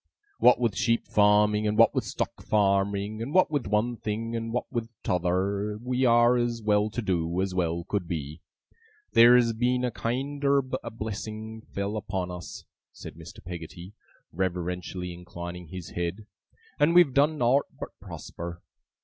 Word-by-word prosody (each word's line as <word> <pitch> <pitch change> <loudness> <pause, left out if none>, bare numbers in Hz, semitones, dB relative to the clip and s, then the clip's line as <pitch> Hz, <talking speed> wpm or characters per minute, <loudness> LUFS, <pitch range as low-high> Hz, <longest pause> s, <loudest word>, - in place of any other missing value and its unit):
What 125 0 +6
with 115 -5 0
sheep 115 -1 +1
farming, 105 +1 +4
and 105 0 0
what - - +6
with - - -1
stock - - -4
farming, 100 +1 +1
and 135 +8 -4
what 185 -4 +5
with 145 -7 -1
one 110 +4 0
thing 115 +2 -3
and 115 0 -3
what 125 - -1
with 115 -3 -3
t'other, 95 +4 0
we 125 +2 0
are 120 +1 +5
as 120 -1 0
well 105 0 +2
to 120 +2 -4
do, 85 -2 -1
as 95 0 -1
well 85 -2 -1
could 95 -1 -3
be. 80 -1 -5 0.7
Theer's 120 0 +7
been 125 +2 +1
kiender 140 +4 0 0.2
a - - -5
blessing 110 0 -6
fell 100 0 -4
upon 95 -3 -3
us,' 90 -1 -8 0.3
said - - -10
Mr. 85 +4 -12
Peggotty, 85 +2 -8 0.4
reverentially 90 0 -3
inclining 85 0 -8
his 90 0 -8
head, 90 +5 -3 0.5
'and 160 +4 +4
we've 175 -7 +6
done 150 +3 +3
nowt 130 +2 +3
but - - -5
prosper. 85 0 -8
105 Hz, 155 wpm, -27 LUFS, 90-120 Hz, 0.7 s, Theer's